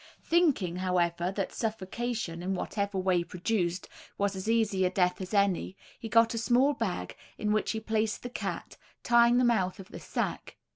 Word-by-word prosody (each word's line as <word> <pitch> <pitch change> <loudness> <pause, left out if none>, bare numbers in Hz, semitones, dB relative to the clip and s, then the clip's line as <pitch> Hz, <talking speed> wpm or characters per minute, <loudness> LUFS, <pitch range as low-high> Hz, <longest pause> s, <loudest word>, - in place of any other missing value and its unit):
Thinking, 285 - +2
however, 175 -1 0
that 195 -2 -3
suffocation, 220 -4 -3
in 190 +2 -1
whatever 200 +1 -2
way 185 -2 +2
produced, 180 0 -2 0.3
was 200 -1 0
as 190 +3 -4
easy 220 -4 +2
a 180 - +3
death 180 0 +1
as 185 - -6
any, 200 -2 +1 0.2
he 225 - -6
got 230 +1 +4
a 230 - -2
small 250 +5 +3
bag, 185 - -3 0.2
in 210 -1 0
which 215 - 0
he 220 - -1
placed 220 0 -1
the 245 - -4
cat, - - -5 0.3
tying 235 0 +5
the 255 - +4
mouth 200 -7 +1
of 190 - -10
the - - -8
sack. - - -4
200 Hz, 180 wpm, -29 LUFS, 185-230 Hz, 0.3 s, tying